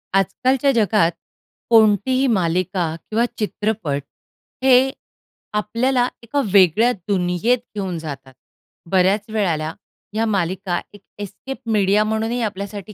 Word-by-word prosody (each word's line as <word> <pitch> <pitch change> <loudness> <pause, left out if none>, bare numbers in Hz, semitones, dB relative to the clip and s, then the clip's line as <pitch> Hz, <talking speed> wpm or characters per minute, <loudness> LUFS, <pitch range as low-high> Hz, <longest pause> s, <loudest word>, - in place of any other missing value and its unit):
आजकालच्या 255 +8 +2
जगात 210 -7 +3 0.6
कोणतीही 230 +4 +4
मालिका 185 -4 0
किंवा 225 +2 +2
चित्रपट 210 -9 -2 0.6
हे 265 0 +5 0.6
आपल्याला 245 +4 +1 0.2
एका 280 +5 -1
वेगळ्या 200 +5 +5
दुनियेत 185 +4 0 0.2
घेऊन 190 -4 -3
जातात. 135 -4 -8 0.6
बऱ्याच 195 +2 +3
वेळेला 165 -7 -1 0.4
ह्या 220 +1 0
मालिका 190 -3 -1
एक 205 - -14 0.2
एस्केप 205 +7 -7
मीडिया 205 0 +3
म्हणूनही 220 +3 -1
आपल्यासाठी 205 -1 -5
205 Hz, 100 wpm, -20 LUFS, 185-230 Hz, 0.6 s, हे